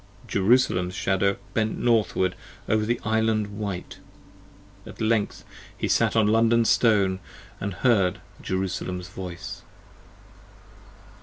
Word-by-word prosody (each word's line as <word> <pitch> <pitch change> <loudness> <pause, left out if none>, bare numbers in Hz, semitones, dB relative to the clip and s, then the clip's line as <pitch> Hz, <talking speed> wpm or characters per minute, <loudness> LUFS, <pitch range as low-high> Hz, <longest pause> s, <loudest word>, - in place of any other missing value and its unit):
Jerusalem's 95 -4 +2
Shadow 95 +1 +1 0.2
bent 110 -1 0
northward 110 -6 +2 0.3
over 110 0 +1
the 120 +1 0
Island 110 -2 0
white. 100 -4 -5 0.9
At - - -11
length 110 -2 0 0.3
he - - -1
sat - - +2
on 110 -2 +4
London 115 +2 +3
Stone, 100 -6 +3 0.3
& - - -25
heard 100 -1 +1 0.2
Jerusalem's 90 -1 -3
voice. 90 -2 -7
105 Hz, 100 wpm, -25 LUFS, 95-110 Hz, 0.9 s, on